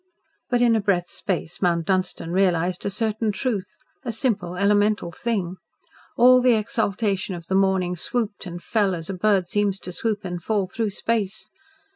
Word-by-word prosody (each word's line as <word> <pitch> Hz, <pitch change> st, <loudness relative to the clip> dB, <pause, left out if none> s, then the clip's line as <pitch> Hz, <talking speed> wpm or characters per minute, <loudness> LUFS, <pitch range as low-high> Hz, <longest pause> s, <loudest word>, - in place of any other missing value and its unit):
But 245 Hz, -1 st, +3 dB
in 235 Hz, -2 st, +4 dB
a 220 Hz, -, +2 dB
breath's 180 Hz, -3 st, 0 dB
space 175 Hz, -3 st, -3 dB
Mount 170 Hz, -3 st, +2 dB
Dunstan 185 Hz, -2 st, -1 dB
realised 180 Hz, -1 st, +1 dB
a -, -, +1 dB
certain 215 Hz, +1 st, 0 dB
truth 205 Hz, -3 st, -2 dB, 0.3 s
a 245 Hz, -, -2 dB
simple, 210 Hz, -7 st, -1 dB
elemental 205 Hz, -1 st, +2 dB
thing. 190 Hz, -3 st, -2 dB, 0.6 s
All 255 Hz, +1 st, +7 dB
the 250 Hz, -2 st, +5 dB
exaltation 205 Hz, -3 st, -1 dB
of 170 Hz, -1 st, -9 dB
the 190 Hz, -, -3 dB
morning 190 Hz, -2 st, +2 dB
swooped 210 Hz, +2 st, -2 dB
and 175 Hz, 0 st, -7 dB
fell 205 Hz, -5 st, +1 dB
as 165 Hz, +2 st, -6 dB
a -, -, -4 dB
bird 190 Hz, -1 st, +2 dB
seems 205 Hz, 0 st, 0 dB
to 180 Hz, -, -6 dB
swoop 210 Hz, +2 st, -2 dB
and 175 Hz, -1 st, -4 dB
fall 205 Hz, +1 st, 0 dB
through 215 Hz, +4 st, -2 dB
space. 215 Hz, 0 st, -2 dB
200 Hz, 170 wpm, -24 LUFS, 180-220 Hz, 0.6 s, All